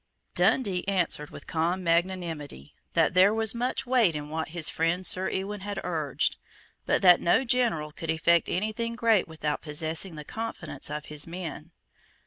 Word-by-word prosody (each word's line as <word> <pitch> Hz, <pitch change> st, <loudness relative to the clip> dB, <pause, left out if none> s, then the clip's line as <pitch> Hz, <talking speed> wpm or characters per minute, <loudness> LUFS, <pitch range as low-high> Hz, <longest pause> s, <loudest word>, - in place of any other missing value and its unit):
Dundee 195 Hz, -8 st, +2 dB
answered 175 Hz, -6 st, 0 dB
with -, -, -11 dB
calm 170 Hz, +3 st, -1 dB
magnanimity 165 Hz, -, -1 dB, 0.2 s
that -, -, +3 dB
there 185 Hz, +3 st, +6 dB
was 220 Hz, -2 st, +2 dB
much 250 Hz, +3 st, -2 dB
weight 240 Hz, -10 st, +3 dB
in 150 Hz, 0 st, -5 dB
what 160 Hz, +1 st, -3 dB
his 165 Hz, -1 st, -2 dB
friend 165 Hz, +3 st, +1 dB
Sir 185 Hz, +1 st, +3 dB
Ewan 200 Hz, +2 st, -3 dB
had 200 Hz, 0 st, -5 dB
urged, 155 Hz, -6 st, -1 dB, 0.5 s
but -, -, +2 dB
that 180 Hz, -2 st, +7 dB
no 175 Hz, +9 st, +3 dB
general 235 Hz, -, +1 dB
could 165 Hz, +2 st, -7 dB
effect 160 Hz, +1 st, +3 dB
any 210 Hz, +5 st, 0 dB
thing 230 Hz, +1 st, -3 dB
great 230 Hz, -4 st, +3 dB
without 155 Hz, -2 st, -3 dB
possessing 160 Hz, +3 st, -3 dB
the 150 Hz, -1 st, -8 dB
confidence 225 Hz, -4 st, -5 dB
of 150 Hz, 0 st, -5 dB
his 150 Hz, 0 st, -6 dB
men. 165 Hz, -2 st, -7 dB
175 Hz, 165 wpm, -27 LUFS, 160-205 Hz, 0.5 s, that